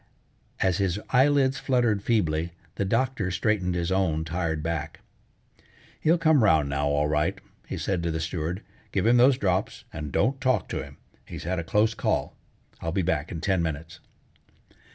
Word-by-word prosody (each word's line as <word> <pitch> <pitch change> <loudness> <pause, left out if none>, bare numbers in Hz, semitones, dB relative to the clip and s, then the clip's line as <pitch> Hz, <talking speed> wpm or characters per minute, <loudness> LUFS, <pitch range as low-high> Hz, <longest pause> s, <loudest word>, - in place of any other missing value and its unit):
As 95 -1 +2
his 95 0 0
eyelids 135 0 +3
fluttered 120 -6 +1
feebly, 85 -7 0 0.2
the 100 - -2
doctor 115 -1 0
straightened 95 -1 0
his 85 +1 -1
own 80 -5 +1
tired 80 -2 -2
back. 80 -1 -4 1.0
"He'll 165 +3 +3
come 160 -6 +4
round 80 -8 +4
now, 70 +1 0
all 75 +1 +1
right," 75 0 0 0.3
he - - -4
said 95 -3 -1
to 85 - -1
the 80 0 -2
steward. 80 +3 -3 0.3
"Give 95 - 0
him 120 +2 +5
those 125 +2 +5
drops 95 -6 -1
and 75 -1 -5
don't 130 - +1
talk 130 -6 +1
to - - -2
him. - - -13 0.3
He's - - -8
had 90 +1 -1
a - - -3
close 105 +6 +2
call. - - -1 0.5
I'll 80 - -2
be 95 +2 0
back 80 -3 -1
in 80 - -5
ten 95 0 +1
minutes." 80 0 -4
90 Hz, 175 wpm, -26 LUFS, 80-115 Hz, 1.0 s, him